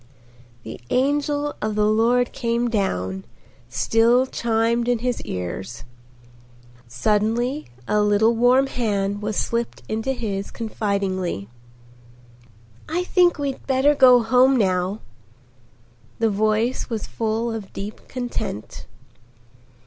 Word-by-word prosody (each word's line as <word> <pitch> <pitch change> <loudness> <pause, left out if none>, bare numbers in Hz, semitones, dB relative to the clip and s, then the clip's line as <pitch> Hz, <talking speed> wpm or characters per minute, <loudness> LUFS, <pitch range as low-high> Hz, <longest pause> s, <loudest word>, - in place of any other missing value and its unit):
"The 110 - -9
angel 290 +2 0
of 215 0 -2
the 210 0 +2
Lord 235 +3 +2
came 235 0 -1
down," 95 - -1 0.5
still 235 +3 +3
chimed 235 -1 0
in 245 -1 +2
his 245 +1 -2
ears. 95 +5 -5 1.0
Suddenly 220 - 0 0.2
a 210 - +2
little 210 +2 +3
warm 250 +3 +4
hand 205 -6 -1
was 210 0 -3
slipped 235 0 -2
into 225 +5 -1
his 200 -5 -4
confidingly. 195 - -3 1.4
"I 345 +3 0
think 360 -1 +3
we'd 280 -2 -4
better 270 +2 +3
go 250 -4 +6
home 255 +3 +4
now." 185 0 0 1.2
The 225 -1 +1
voice 215 +5 0
was 225 -3 -3
full 225 +1 -2
of 220 -3 -6
deep 205 +2 -8
content. 240 - -5
225 Hz, 110 wpm, -22 LUFS, 205-250 Hz, 1.4 s, go